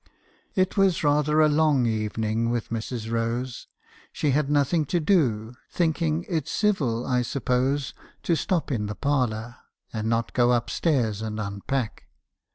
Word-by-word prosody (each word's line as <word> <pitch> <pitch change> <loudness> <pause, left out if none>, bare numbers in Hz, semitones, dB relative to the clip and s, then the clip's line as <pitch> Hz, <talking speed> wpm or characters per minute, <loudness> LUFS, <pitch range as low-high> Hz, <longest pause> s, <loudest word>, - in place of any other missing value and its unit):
"It 185 -2 +1
was 195 -4 +3
rather 150 +1 +3
a 155 - +6
long 150 -4 +3
evening 110 0 -1
with 120 -1 -2
Mrs. 115 0 -4
Rose. 115 +2 -2 0.4
She 145 - 0
had 145 +1 +1
nothing 150 +3 +2
to 175 +5 0
do, 125 - +1 0.2
thinking 165 -1 0
it 160 -6 -2
civil, 140 - 0
I 125 -1 +1
suppose, 130 +2 0 0.3
to 170 - +2
stop 170 -2 -1
in 105 -5 -1
the 105 - -5
parlour, 120 -5 -1 0.4
and 110 0 -2
not 115 0 0
go 120 -1 +3
up 120 0 0
stairs 120 - 0
and 110 -1 -4
unpack. 105 +4 -3
130 Hz, 150 wpm, -25 LUFS, 115-150 Hz, 0.4 s, a